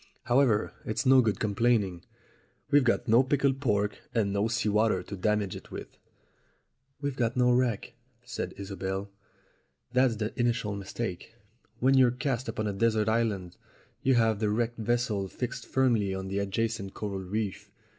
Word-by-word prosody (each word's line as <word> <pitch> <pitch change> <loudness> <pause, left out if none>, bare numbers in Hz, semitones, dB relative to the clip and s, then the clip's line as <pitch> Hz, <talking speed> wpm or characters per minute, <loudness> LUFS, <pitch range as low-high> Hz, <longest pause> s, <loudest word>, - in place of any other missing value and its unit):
However, 120 -4 +2
it's 110 +6 -2
no 130 0 +7
good 110 -4 0
complaining. 105 -4 +1 0.7
We've 145 -1 +6
got 120 +1 +1
no 115 +2 +6
pickled 135 0 +1
pork 105 -5 0 0.2
and 100 -4 +1
no 100 +2 +1
sea 115 0 -1
water 105 -3 +2
to 100 - -7
damage 105 0 0
it - - -10
with." - - -8 1.1
"We've 140 -2 -2
got 120 -1 -1
no 125 0 +4
wreck," 120 -2 0 0.3
said 120 -2 -5
Isobel, 95 0 -4 0.8
"that's 125 -2 +3
the 110 0 -3
initial 120 -4 0
mistake. 100 +1 -5 0.4
When 130 +3 +3
you're 130 -2 +6
cast 125 0 -2
upon 110 -1 -2
a 105 - -1
desert 110 +1 +2
island 105 -6 -1 0.4
you 135 -1 +3
have 110 -3 +3
the 110 -1 +1
wrecked 115 +2 -1
vessel 110 -3 0
fixed 125 +5 -5
firmly 115 -7 +2
on 95 0 -5
the 100 +1 -1
adjacent 100 0 -2
coral 100 -2 -4
reef. 100 +1 -4
110 Hz, 155 wpm, -29 LUFS, 100-120 Hz, 1.1 s, no